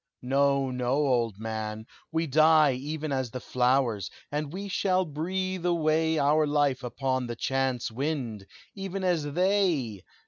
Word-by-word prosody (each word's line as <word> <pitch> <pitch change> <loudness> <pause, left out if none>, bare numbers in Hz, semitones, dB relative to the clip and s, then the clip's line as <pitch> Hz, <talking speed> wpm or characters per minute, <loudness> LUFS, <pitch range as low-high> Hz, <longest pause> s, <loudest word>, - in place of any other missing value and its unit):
"No, 140 +1 +2
no, 125 0 -1
old 125 -8 +1
man! 110 0 -4 0.3
we 165 +1 0
die 155 0 +5
Even 150 +4 -4
as 130 -3 -1
the 125 - -6
flowers, 125 -5 +1 0.2
and 150 0 -2
we 195 +4 -5
shall 185 -1 +1
breathe 185 +4 -3
away 160 -2 +2
Our 150 +1 +3
life 145 -3 +1
upon 130 0 -2
the 120 - -4
chance 130 -2 -1
wind, 120 -6 -3 0.3
even 195 -1 -5
as 160 -6 0
they! 175 - +1
140 Hz, 140 wpm, -28 LUFS, 125-160 Hz, 0.3 s, die